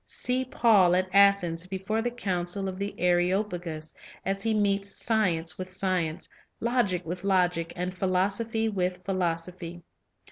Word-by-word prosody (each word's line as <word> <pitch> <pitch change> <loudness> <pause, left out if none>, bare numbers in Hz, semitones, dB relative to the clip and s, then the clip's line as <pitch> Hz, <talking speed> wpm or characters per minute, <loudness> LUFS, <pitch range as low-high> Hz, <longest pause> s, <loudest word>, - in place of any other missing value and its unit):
See 255 +1 -1
Paul 210 -8 +4
at 185 0 -1
Athens 195 -4 +4
before 195 +4 -2
the 240 - 0
council 195 -4 -2
of 185 0 -5
the 200 +1 -3
Areop 180 +3 +2
agus, 160 -3 -5 0.3
as 195 +1 -1
he 225 - +1
meets 200 -2 +1
science 180 -7 0
with 185 0 -5
science, 185 -4 -1 0.3
logic 230 -7 0
with 175 +2 -5
logic, 180 -4 +1
and 180 +1 -3
philosophy 200 +5 0
with 180 -3 -2
philosophy. 175 -2 -3
185 Hz, 140 wpm, -27 LUFS, 175-200 Hz, 0.3 s, Paul